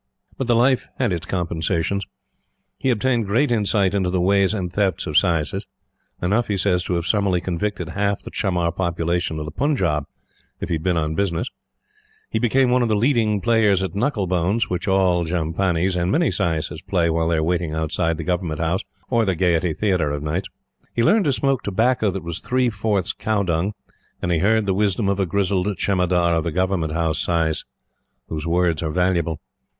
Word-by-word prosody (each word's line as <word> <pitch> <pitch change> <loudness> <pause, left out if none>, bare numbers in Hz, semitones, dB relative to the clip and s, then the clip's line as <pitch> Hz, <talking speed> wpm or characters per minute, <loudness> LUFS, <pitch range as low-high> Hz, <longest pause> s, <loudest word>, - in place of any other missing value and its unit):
But 135 - -3
the 120 - +3
life 125 +2 +2
had 125 -6 +1
its 85 -2 -4
compensations. 85 +2 -1 0.7
He 130 - 0
obtained 120 -1 +1
great 120 +7 +2
insight 100 -3 +2
into 95 -3 +1
the 90 0 0
ways 100 +1 +3
and 95 -5 -3
thefts 95 -4 0
of 80 - -4
saises 85 +2 +2 0.6
enough, 105 +7 +1
he 100 - -1
says, 90 -1 +1
to 90 - -1
have 85 -1 -2
summarily 100 -4 +1
convicted 90 0 -3
half 100 +1 -1
the - - -8
chamar 90 -4 0
population 85 -1 -1
of 75 - -4
the 75 - -6
Punjab 90 - 0 0.5
if - - -5
he - - 0
had 80 - -1
been 90 0 +1
on 80 -1 0
business. 95 +5 -1 0.8
He - - 0
became 125 +1 +2
one 125 0 +3
of 120 - +1
the 110 - +2
leading 110 -3 +2
players 110 -4 +3
at 95 - -3
knuckle 105 0 0
bones, 90 +5 0
which 90 +2 -2
all 95 -3 +3
jhampanis 85 +2 0
and 90 +1 0
many 170 +8 +2
saises 80 -1 -2
play 85 -3 +2
while 80 0 0
they 85 -1 +1
are 80 - +1
waiting 85 -1 -1
outside 80 +1 -1
the 80 - -4
Government 90 -3 -2
House 85 +4 0 0.3
or 115 -2 +3
the 95 -4 0
Gaiety 85 -1 +1
Theatre 90 -8 +1
of 75 0 -3
nights; 80 +5 -2 0.5
he 115 - +2
learned 205 - +4
to 145 - +3
smoke 135 -2 +1
tobacco 110 +2 +1
that 95 0 -4
was 85 0 -4
three 125 -1 +1
fourths 100 -3 -1
cowdung; 100 -3 0 0.5
and 90 - -2
he 85 - +2
heard 110 +3 +2
the 95 - +1
wisdom 100 +1 +1
of 100 -1 +1
the 95 -2 0
grizzled 95 +1 0
Jemadar 90 -3 +1
of 80 - 0
the 85 - -1
Government 90 -3 0
House 80 -1 0
saises, 80 -2 0 0.6
whose 80 0 -4
words 85 -2 +1
are 80 - -2
valuable. 85 -2 0
95 Hz, 195 wpm, -22 LUFS, 85-105 Hz, 0.8 s, learned